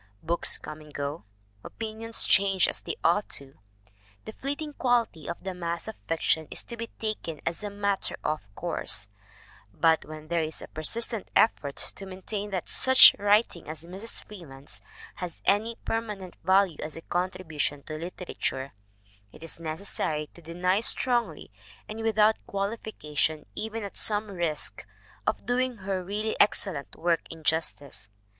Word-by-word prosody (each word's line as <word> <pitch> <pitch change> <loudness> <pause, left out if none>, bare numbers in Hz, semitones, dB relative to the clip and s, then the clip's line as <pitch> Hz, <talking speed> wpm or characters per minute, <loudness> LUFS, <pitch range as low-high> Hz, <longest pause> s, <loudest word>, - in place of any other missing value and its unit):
Books 170 +2 +4
come 155 0 -8
and 150 -1 -14
go, 145 -1 -4 0.4
opinions 225 0 -2
change 195 -1 +4
as - - -2
they - - -4
ought 175 +5 +3
to; 135 -1 -3 0.7
the - - -6
fleeting 285 +4 -4
quality 240 - +1
of 170 - -5
the 190 -1 -3
mass 170 0 -2
of 220 - -5
fiction 160 -1 +1
is - - +2
to 235 - -8
be 230 0 -5
taken 210 -8 -3
as 170 +5 -2
a 205 - -2
matter 200 -1 0
of 155 - 0
course; 130 - 0 0.6
but 160 -1 +3
when 155 0 -9
there 170 0 +1
is 155 0 -2
a - - -7
persistent 225 +8 0
effort 145 -10 +3
to 195 - -4
maintain 200 +2 -4
that 185 -3 -3
such 260 0 +10
writing 205 -5 +3
as 155 +1 -7
Mrs. 195 +6 -3
Freeman's 145 -9 -9 0.4
has 180 -2 -5
any 220 +3 +2
permanent 210 -5 -3
value 190 -2 +4
as 155 - -3
a 165 - -7
contribution 160 -5 -2
to 155 - -7
literature, 160 -5 -4 0.6
it 155 - -13
is 165 - -2
necessary 155 -2 -2
to 170 - -14
deny 180 +4 +1
strongly 240 +1 +1 0.4
and 215 +1 -6
without 220 -1 +3
qualification 195 -7 -2
even 220 - -4
at 200 - -7
some 210 -1 +2
risk 170 -5 -2 0.4
of - - 0
doing 250 0 +1
her 190 -1 -2
really 210 +4 -2
excellent 190 -7 +2
work 170 0 +1
injustice. 155 -9 -1
185 Hz, 150 wpm, -28 LUFS, 160-215 Hz, 0.7 s, such